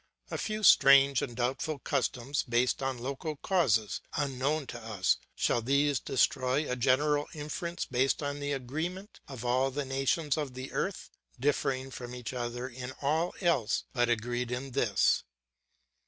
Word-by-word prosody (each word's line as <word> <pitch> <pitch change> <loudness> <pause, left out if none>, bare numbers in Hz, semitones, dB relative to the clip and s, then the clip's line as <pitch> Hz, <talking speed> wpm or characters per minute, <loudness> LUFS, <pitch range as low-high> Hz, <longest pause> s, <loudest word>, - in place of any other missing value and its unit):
A - - -2
few 215 0 -3
strange 140 - +7
and 120 -3 -4
doubtful 135 +5 -1
customs, 135 0 -1
based 120 +3 +2
on 135 -1 -1
local 140 +5 -4
causes, 135 - +1 0.2
unknown 145 +1 0
to 120 -1 -8
us; 105 -6 +1 0.2
shall 120 - +1
these 140 +2 +2
destroy 135 +2 +1
a 125 - -1
general 145 +4 +2
inference 170 +4 -4
based 130 +3 +1
on 145 0 -3
the 145 0 -3
agreement 160 - -4
of 130 -3 -8
all 130 +2 +2
the 140 +1 -3
nations 135 +3 0
of 145 -5 -3
the 130 +1 -6
earth, 195 - -3 0.3
differing 135 -1 0
from 125 -1 -7
each 125 0 -6
other 120 0 -3
in 130 0 -7
all 160 +5 +1
else, 165 - +1
but 120 -2 +2
agreed 120 +1 -1
in 130 +2 -4
this? - - +2
135 Hz, 155 wpm, -30 LUFS, 125-145 Hz, 0.3 s, strange